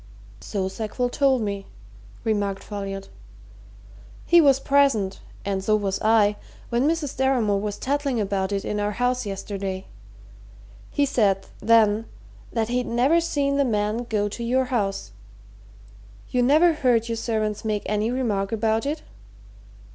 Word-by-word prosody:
"So 195 -3 -3
Sackville 220 +5 -2
told 265 -2 +2
me," 200 -1 -4 0.6
remarked 205 -3 -1
Folliot. 195 -1 -6 1.2
"He 345 0 +6
was 275 -3 +5
present 275 -10 +2 0.3
and 195 -1 -1
so 215 +2 +3
was 195 -2 -1
I 215 -1 +3 0.3
when 240 +4 +1
Mrs. 315 -4 -1
Deramore 245 -7 +2
was 205 -1 -3
tattling 280 -2 -1
about 195 -1 -1
it 200 -1 -2
in 210 - -2
our 205 0 -1
house 245 0 0
yesterday. 195 -1 -4 1.0
He 285 - +1
said, 200 -8 +1
then, 225 -1 +4 0.5
that 225 -1 -1
he'd 250 0 -1
never 265 +8 +3
seen 280 -4 0
the 280 - +4
man 220 0 -1
go 205 -2 +1
to 225 +3 -6
your 255 +3 +1
house. 195 - -1 1.2
You 250 - +2
never 310 +7 +5
heard 245 -6 +2
your 230 - -2
servants 215 -2 -2
make 215 -2 -1
any 210 +1 0
remark 220 -6 -1
about 225 +2 0
it?" 300 +2 -3
220 Hz, 140 wpm, -24 LUFS, 205-255 Hz, 1.2 s, He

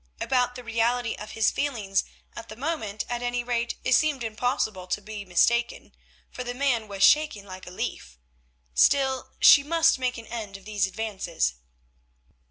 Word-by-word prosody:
About 250 -1 +1
the 250 - -8
reality 230 +1 0
of 210 - -9
his 225 -1 +2
feelings 215 -9 -1 0.3
at - - -9
the 215 - -8
moment, 235 -7 -3
at 240 0 -3
any 245 0 -1
rate, 240 -1 -1
it 255 - +2
seemed 280 -1 +2
impossible 220 -4 -2
to 180 - -1
be 210 0 -8
mistaken, 235 +6 +1 0.4
for 250 - -6
the 245 0 -5
man 250 -5 0
was 200 -1 -2
shaking 295 -9 +4
like 185 -1 -10
a - - -8
leaf. - - -5 0.6
Still, 265 - +2
she 285 - +8
must 330 0 +3
make 250 -1 -1
an 230 - -9
end 215 -4 -6
of 195 - -19
these 205 -2 0
advances. 190 - -2
230 Hz, 170 wpm, -26 LUFS, 205-250 Hz, 0.6 s, she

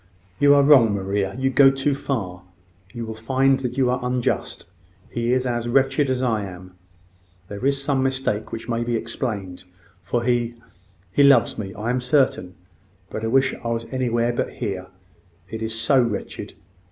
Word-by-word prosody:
"You 145 0 +6
are 140 - +5
wrong, 130 -8 +6
Maria. 95 0 -2
You 135 0 0
go 135 +1 +7
too 135 +1 0
far. 100 -10 -4 0.5
You 115 +2 -6
will 110 - -5
find 130 +4 +1
that 125 -1 -4
you 130 -2 +2
are 125 - 0
unjust. 125 -7 -2 0.4
He 120 0 -1
is 130 0 +1
as 120 -1 -2
wretched 135 +2 +2
as 130 0 0
I 110 -4 0
am. 90 -1 -10 0.8
There 100 +3 -7
is 140 0 +1
some 140 -2 +1
mistake 130 -5 -1
which 115 0 -6
may 115 -1 -1
be 120 0 -1
explained: 110 -5 -4 0.4
for 115 +7 -2
he... 120 -1 0 0.6
he 120 - +2
loves 140 -6 +5
me, 95 -3 -5
I 110 +4 -2
am 125 0 -1
certain. 125 -8 +1 0.6
But 110 - -5
I - - 0
wish 135 +3 +2
I - - -3
was 115 0 -2
anywhere 120 -2 0
but - - -2
here - - -4 0.6
it 110 0 -6
is 110 0 -3
so 135 +2 +4
wretched!" 115 -4 -4
120 Hz, 175 wpm, -22 LUFS, 110-135 Hz, 0.8 s, go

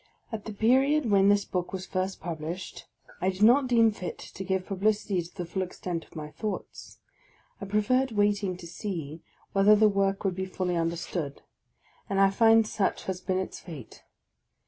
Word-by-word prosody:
At 220 -2 -5
the 220 - -5
time 265 +8 +3
wrhen 195 0 +5
this 205 0 +3
book 180 -1 -3
was 185 -1 -5
first 190 0 -2
published, 170 +2 -6 0.3
I 185 - +2
did 190 +2 -1
not 255 +5 +6
deem 230 -2 +5
fit 180 -4 -6
to 190 - -8
give 190 -1 -1
publicity 200 -1 0
to 170 +1 -12
the 175 - -3
full 190 +3 -3
extent 180 -2 -4
of - - -22
my 150 -1 -6
thoughts; 215 +5 -6 0.6
I - - -4
preferred 220 +6 +1
wraiting 205 -3 +1
to 180 - -11
see 165 -3 -5 0.3
whether 200 +2 +6
the 215 +1 +5
work 195 0 0
would 195 -2 +1
be 190 +1 -3
fully 185 -1 -2
understood, 165 -3 -3 0.7
and 195 -1 0
I 195 0 +5
find 225 +2 +5
such 210 -2 -1
has 185 -1 -4
been 185 0 -1
its 190 - -4
fate. 150 -9 -11
195 Hz, 180 wpm, -28 LUFS, 180-210 Hz, 0.7 s, not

